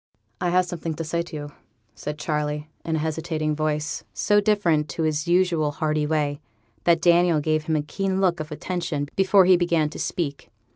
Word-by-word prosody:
'I 180 Hz, -, +1 dB
have 180 Hz, +1 st, +3 dB
something 165 Hz, -2 st, -4 dB
to 165 Hz, -, -4 dB
say 170 Hz, +2 st, -1 dB
to 170 Hz, -1 st, -8 dB
you,' 145 Hz, -1 st, -6 dB, 0.4 s
said 150 Hz, +8 st, -6 dB
Charley, 150 Hz, 0 st, -2 dB, 0.2 s
in 160 Hz, -, -1 dB
a 155 Hz, 0 st, -1 dB
hesitating 155 Hz, -1 st, -2 dB
voice, 150 Hz, 0 st, -2 dB
so 205 Hz, 0 st, +3 dB
different 175 Hz, -8 st, +2 dB
to 165 Hz, -, -3 dB
his 155 Hz, 0 st, 0 dB
usual 170 Hz, -4 st, +2 dB
hearty 150 Hz, 0 st, 0 dB
way, 145 Hz, -2 st, -1 dB, 0.4 s
that 170 Hz, -1 st, +3 dB
Daniel 175 Hz, -2 st, +4 dB
gave 155 Hz, +1 st, 0 dB
him 160 Hz, -, 0 dB
a 150 Hz, -, 0 dB
keen 190 Hz, +5 st, -2 dB
look 180 Hz, -3 st, +2 dB
of 155 Hz, 0 st, -6 dB
attention 165 Hz, -3 st, -3 dB
before 195 Hz, 0 st, +5 dB
he 185 Hz, 0 st, +7 dB
began 170 Hz, -3 st, +1 dB
to -, -, -8 dB
speak. 145 Hz, -5 st, -3 dB
160 Hz, 190 wpm, -24 LUFS, 150-175 Hz, 0.4 s, he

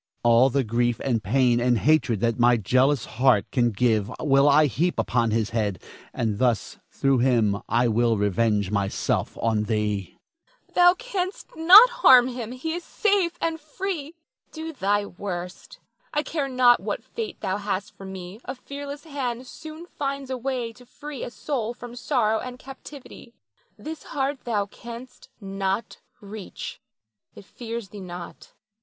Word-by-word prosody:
All 120 Hz, +2 st, +5 dB
the 135 Hz, +1 st, +1 dB
grief 120 Hz, +1 st, 0 dB
and 120 Hz, -5 st, 0 dB
pain 120 Hz, +3 st, +3 dB
and 120 Hz, 0 st, +2 dB
hatred 135 Hz, -7 st, +2 dB
that 115 Hz, 0 st, 0 dB
my 120 Hz, 0 st, +5 dB
jealous 130 Hz, +5 st, +2 dB
heart 125 Hz, -4 st, +2 dB
can 120 Hz, -3 st, +2 dB
give 110 Hz, -1 st, +1 dB
will 140 Hz, -1 st, +4 dB
I 150 Hz, +2 st, +6 dB
heap 155 Hz, -, 0 dB
upon 120 Hz, -2 st, +1 dB
his 110 Hz, 0 st, 0 dB
head, 105 Hz, -6 st, -1 dB, 0.3 s
and 110 Hz, -3 st, -2 dB
thus 120 Hz, -4 st, 0 dB
through 135 Hz, -2 st, +1 dB
him 115 Hz, -5 st, +2 dB
I 120 Hz, +3 st, +3 dB
will 115 Hz, 0 st, +2 dB
revenge 105 Hz, 0 st, +1 dB
myself 100 Hz, -1 st, -1 dB
on 110 Hz, -2 st, +1 dB
thee. 105 Hz, -3 st, -2 dB, 0.5 s
Nina. -, -, -31 dB
Thou 355 Hz, 0 st, +6 dB
canst 390 Hz, -4 st, -4 dB
not 370 Hz, +9 st, +9 dB
harm 255 Hz, -, +6 dB
him, 240 Hz, -2 st, -6 dB
he 265 Hz, +6 st, -4 dB
is 350 Hz, +1 st, -4 dB
safe 395 Hz, -5 st, +1 dB
and 325 Hz, -1 st, -1 dB
free. 315 Hz, 0 st, -5 dB, 0.4 s
Do 320 Hz, 0 st, -6 dB
thy 205 Hz, -4 st, 0 dB
worst, 180 Hz, -2 st, -7 dB, 0.4 s
I 295 Hz, -, +2 dB
care 295 Hz, -5 st, -2 dB
not 250 Hz, -2 st, +5 dB
what -, -, -4 dB
fate 445 Hz, -4 st, -6 dB
thou 190 Hz, +1 st, -1 dB
hast 200 Hz, -1 st, -4 dB
for 195 Hz, -, -11 dB
me, 190 Hz, +2 st, -8 dB
a 255 Hz, -, -6 dB
fearless 285 Hz, +2 st, -8 dB
hand 260 Hz, -5 st, -4 dB
soon 315 Hz, +4 st, -10 dB
finds 275 Hz, -5 st, -4 dB
a 260 Hz, -, -2 dB
way 250 Hz, -2 st, -3 dB
to 250 Hz, +2 st, -17 dB
free 290 Hz, 0 st, -8 dB
a -, -, -4 dB
soul 240 Hz, -3 st, -3 dB
from 245 Hz, 0 st, -10 dB
sorrow 220 Hz, -2 st, +1 dB
and 250 Hz, +1 st, -7 dB
captivity. 270 Hz, -2 st, -12 dB, 0.4 s
This 310 Hz, +9 st, -7 dB
heart 275 Hz, 0 st, -3 dB
thou 210 Hz, -4 st, 0 dB
canst 235 Hz, +4 st, -11 dB
not 195 Hz, +1 st, -3 dB, 0.2 s
reach. 205 Hz, -1 st, -8 dB, 0.5 s
It -, -, -13 dB
fears 230 Hz, -2 st, -7 dB
thee 210 Hz, -, -10 dB
not. 175 Hz, -2 st, -9 dB
200 Hz, 160 wpm, -25 LUFS, -, 0.5 s, not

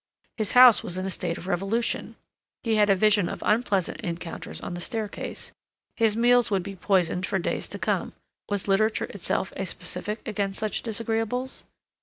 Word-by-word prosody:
His 215 Hz, -4 st, -1 dB
house 250 Hz, -2 st, +9 dB
was 175 Hz, -, -6 dB
in 185 Hz, -, -2 dB
a 195 Hz, -, -2 dB
state 175 Hz, -2 st, -2 dB
of -, -, -9 dB
revolution; 195 Hz, +6 st, -1 dB, 0.5 s
he 230 Hz, -, +1 dB
had 210 Hz, -1 st, +4 dB
a 195 Hz, -, +6 dB
vision 205 Hz, -2 st, +3 dB
of -, -, -6 dB
unpleasant 210 Hz, -5 st, +1 dB
encounters 170 Hz, -1 st, -5 dB
on -, -, -6 dB
the 175 Hz, -, -5 dB
staircase; 215 Hz, +1 st, -3 dB, 0.4 s
his 225 Hz, -2 st, +2 dB
meals 245 Hz, +1 st, +4 dB
would 195 Hz, -3 st, +1 dB
be 195 Hz, +1 st, -7 dB
poisoned 185 Hz, -1 st, +1 dB
for -, -, 0 dB
days 180 Hz, -, -2 dB
to -, -, -6 dB
come; -, -, -1 dB, 0.4 s
was 205 Hz, -1 st, -2 dB
literature 215 Hz, +3 st, +2 dB
itself -, -, -2 dB
a -, -, -3 dB
specific 210 Hz, +2 st, -4 dB
against 200 Hz, -2 st, -2 dB
such 215 Hz, -1 st, -1 dB
disagreeables? 230 Hz, +3 st, -2 dB
205 Hz, 175 wpm, -26 LUFS, 190-225 Hz, 0.5 s, house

